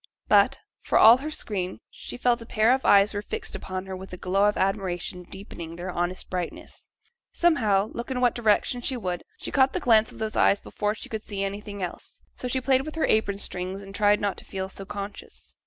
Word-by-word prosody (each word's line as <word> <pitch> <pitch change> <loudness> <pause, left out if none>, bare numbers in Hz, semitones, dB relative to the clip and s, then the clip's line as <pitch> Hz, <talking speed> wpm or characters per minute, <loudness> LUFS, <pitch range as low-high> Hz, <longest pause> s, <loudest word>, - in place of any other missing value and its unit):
But, - - +5 0.2
for - - +1
all 230 +2 +9
her 290 +4 -5
screen, 195 -11 -3
she - - -9
felt 245 -1 +2
a - - -8
pair 220 +3 +3
of 265 - -1
eyes 200 +1 +6
were 205 - -2
fixed - - -4
upon 185 0 -5
her 190 0 -6
with 190 +1 -9
a 180 - -6
glow 195 +3 +1
of 210 - -3
admiration 190 -2 -1
deepening 175 -3 -9
their 180 +2 -5
honest 175 +1 -2
brightness. 180 -2 -6 0.4
Somehow, 215 - +2
look 235 - -5
in 260 -1 -2
what 245 -2 +3
direction 240 +2 +1
she 255 +1 -1
would, 180 -5 -3
she - - -6
caught 265 -1 +3
the - - -1
glance 220 -2 +4
of - - -13
those 220 -1 -3
eyes 200 - +4
before 210 +1 -2
she - - -9
could 220 -1 -4
see 200 -2 -4
anything 200 0 -5
else. 175 - -7
So 250 - -6
she 260 +1 0
played 260 0 +3
with 310 +3 -7
her 320 - +1
apron 210 -2 +1
strings, 190 0 -4
and 195 0 -11
tried 205 0 +3
not 200 -1 -1
to - - -7
feel 190 0 -4
so 195 0 -7
conscious. 200 +1 -8
205 Hz, 220 wpm, -26 LUFS, 190-230 Hz, 0.4 s, all